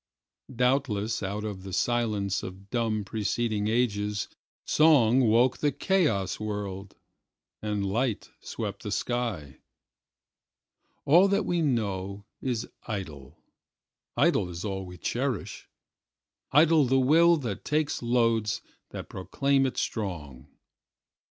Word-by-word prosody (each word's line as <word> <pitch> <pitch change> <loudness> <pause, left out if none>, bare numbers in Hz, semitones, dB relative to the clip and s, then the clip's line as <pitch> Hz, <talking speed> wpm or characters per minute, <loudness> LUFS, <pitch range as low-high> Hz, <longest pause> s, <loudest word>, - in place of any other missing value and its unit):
Doubtless 125 -4 +1
out 100 +1 -3
of 105 -3 -5
the 95 0 -8
silence 105 -2 0
of 95 +2 -10
dumb 110 -3 0
preceding 110 +1 -1
agesSong 115 +4 +2
woke 120 +4 +3
the 145 - +2
chaos 140 - +1
world—and 105 0 -6
light 115 +3 -1
swept 105 -3 -5
the 105 - -5
sky. 105 - -3 1.5
All 175 +7 +6
that 200 +1 +1
we 175 -1 0
know 100 -7 -2 0.2
is 120 -3 -2 0.2
idle; 80 - -7 0.7
idle 90 - +3
is 85 +3 -6
all 95 -2 -4
we 90 0 -10
cherish; - - -3 0.8
Idle 155 0 +5
the 135 +1 +3
will 165 +6 +5
that 115 -9 -4
takes 150 0 0
loads 115 -3 +1 0.3
that - - -7
proclaim 135 +8 0
it 130 - -5
strong. 75 - -4
110 Hz, 105 wpm, -27 LUFS, 100-130 Hz, 1.5 s, All